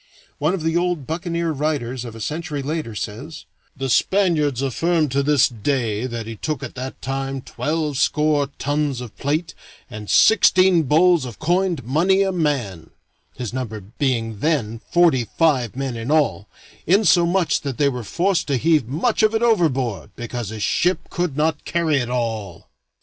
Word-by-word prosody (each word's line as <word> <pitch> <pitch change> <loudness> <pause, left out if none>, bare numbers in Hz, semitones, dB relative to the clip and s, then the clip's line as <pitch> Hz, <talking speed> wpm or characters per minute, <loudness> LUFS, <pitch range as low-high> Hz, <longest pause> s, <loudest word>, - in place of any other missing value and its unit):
One 155 +6 +1
of 170 - -6
the 165 0 0
old 175 -5 0
buccaneer 170 +1 -2
writers 135 -5 -2
of 115 -2 -8
a - - -9
century 150 +3 -4
later 150 -6 -3
says: 120 +11 -6 0.3
"The 135 0 -2
Spaniards 150 -3 +2
affirm 160 +4 +1
to 140 +2 +1
this 145 -1 +4
day 120 -1 -2
that 120 -2 -5
he 115 0 -6
took 155 +3 -3
at - - -6
that 130 +1 -7
time 135 0 -3
twelvescore 150 -1 0
tons 145 -2 -1
of 125 -4 -9
plate 155 +4 -2 0.4
and 105 -1 -8
sixteen 185 -4 +5
bowls 170 +1 +4
of 120 -4 -7
coined 175 -2 0
money 175 - +2
a 195 - 0
man 130 - -2 0.5
(his 120 -3 -5
number 120 -4 -4
being 115 +1 -2
then 115 -7 -1
forty 165 -9 +4
five 135 -9 +2
men 135 -2 -3
in 115 +2 -5
all), 110 - +1 0.4
insomuch 180 -2 +3
that 140 -3 -4
they 145 - +3
were 125 -3 -2
forced 175 - 0
to 140 -3 +1
heave 155 -3 +2
much 170 - 0
of 215 0 +3
it 225 - +1
overboard, 135 - +1
because 120 -2 -5
his 110 -1 -5
ship 180 +2 0
could 175 -6 -2
not 155 0 0
carry 165 -3 +1
it 120 -3 -2
all." 110 -7 -4
145 Hz, 165 wpm, -21 LUFS, 120-165 Hz, 0.5 s, sixteen